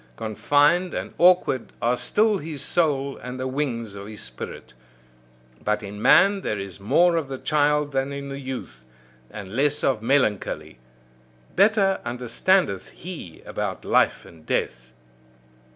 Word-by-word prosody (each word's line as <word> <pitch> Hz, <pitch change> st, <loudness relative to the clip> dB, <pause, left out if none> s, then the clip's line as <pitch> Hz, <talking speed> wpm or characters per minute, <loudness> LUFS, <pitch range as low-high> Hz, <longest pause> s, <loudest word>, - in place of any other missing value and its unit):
Confined 145 Hz, -, +2 dB
and -, -, -5 dB
awkward 175 Hz, -8 st, +3 dB
are 120 Hz, +1 st, +2 dB
still 210 Hz, -, +1 dB
his 150 Hz, -3 st, -6 dB
soul 140 Hz, -5 st, 0 dB
and 125 Hz, +1 st, -7 dB
the 130 Hz, -, -2 dB
wings 125 Hz, -6 st, -3 dB
of 100 Hz, 0 st, -8 dB
his 110 Hz, -1 st, -7 dB
spirit. 65 Hz, +1 st, -8 dB, 0.9 s
But 105 Hz, 0 st, 0 dB
in 105 Hz, +1 st, -7 dB
man 195 Hz, -, +5 dB
there 105 Hz, -, -2 dB
is 95 Hz, -3 st, -7 dB
more 170 Hz, -, +3 dB
of 160 Hz, -4 st, -2 dB
the 135 Hz, -1 st, -5 dB
child 150 Hz, 0 st, +1 dB
than 135 Hz, 0 st, -1 dB
in 140 Hz, 0 st, -6 dB
the 135 Hz, 0 st, -6 dB
youth, 130 Hz, -, -7 dB, 0.5 s
and 105 Hz, -1 st, -8 dB
less 145 Hz, +2 st, +1 dB
of 130 Hz, -5 st, +1 dB
melancholy: 110 Hz, -, 0 dB, 0.8 s
better 195 Hz, -1 st, +3 dB
understandeth 120 Hz, -, 0 dB
he 160 Hz, -, -9 dB
about -, -, -4 dB
life -, -, +2 dB
and 80 Hz, -2 st, -16 dB
death. 65 Hz, -3 st, -2 dB
135 Hz, 140 wpm, -24 LUFS, 105-155 Hz, 0.9 s, man